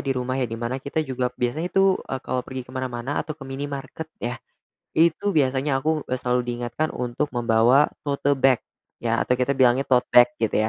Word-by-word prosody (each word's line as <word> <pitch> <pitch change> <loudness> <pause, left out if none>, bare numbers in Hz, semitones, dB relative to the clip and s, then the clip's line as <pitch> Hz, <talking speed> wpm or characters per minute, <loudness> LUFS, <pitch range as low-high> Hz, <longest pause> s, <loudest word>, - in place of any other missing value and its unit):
di 135 -2 -2
rumah 125 0 -2
ya, 125 - 0
di 115 - -5
mana 120 +3 -3
kita 155 +4 -2
juga 125 -2 -1
biasanya 140 +9 -1
itu, 195 0 +3
eee, 135 -1 -5
kalau 130 - -1
pergi 130 0 -7
ke 125 - -15
mana-mana 130 +1 -3
atau 155 - -6
ke 145 - -10
minimarket 140 +3 -6
ya, 120 +1 -4 0.5
itu 170 +5 +2
biasanya 135 -2 +1
aku, 155 +1 0
eee, - - -8
selalu 125 0 0
diingatkan 120 +5 -3
untuk 125 +4 -3
membawa 120 +4 +4 0.2
tote 140 0 +1
bag 135 -2 +3 0.4
ya 115 -1 0
atau - - 0
kita 125 +2 +1
bilangnya 130 +1 +3
tote 125 -1 +4
bag 120 0 +8
gitu 110 -1 +1
130 Hz, 195 wpm, -24 LUFS, 120-145 Hz, 0.5 s, bag